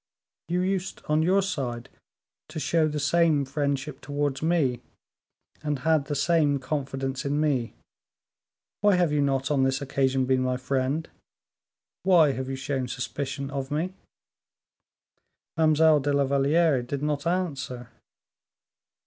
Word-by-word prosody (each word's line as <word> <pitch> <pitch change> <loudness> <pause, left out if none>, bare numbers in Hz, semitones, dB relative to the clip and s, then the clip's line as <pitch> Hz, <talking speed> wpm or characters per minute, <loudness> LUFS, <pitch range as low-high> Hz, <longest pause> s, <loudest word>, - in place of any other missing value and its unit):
"You 175 +2 0
used, 190 0 -2
on 150 +1 +2
your 190 +4 +3
side, 125 -10 -3 0.6
to 155 0 -5
show 160 0 +2
the 150 -1 -3
same 155 -1 +2
friendship 140 0 -2
towards 145 -1 -2
me, 155 -7 +1 0.8
and 150 -1 -1
had 160 -3 +3
the 145 - -3
same 150 -1 +2
confidence 135 -1 -3
in 145 +1 -1
me; 140 -6 0 1.1
why 205 -1 +4
have 175 -3 +2
you 150 -1 +2
not, 135 0 0
on 140 -2 +2
this 135 0 +1
occasion, 135 -2 0
been 130 0 +2
my 130 0 0
friend, 135 +4 -1 0.9
why 175 -6 +5
have 130 0 -4
you 135 - -2
shown 135 -1 -3
suspicion 135 +3 -4
of 135 -1 -4
me?" 165 +5 -2 1.6
Mademoiselle 155 -1 +4
de 145 +1 -1
la 140 0 +3
Valliere 140 +1 +2
did 135 +3 -4
not 150 +1 -1
answer. 140 -9 -2
145 Hz, 135 wpm, -26 LUFS, 135-160 Hz, 1.6 s, why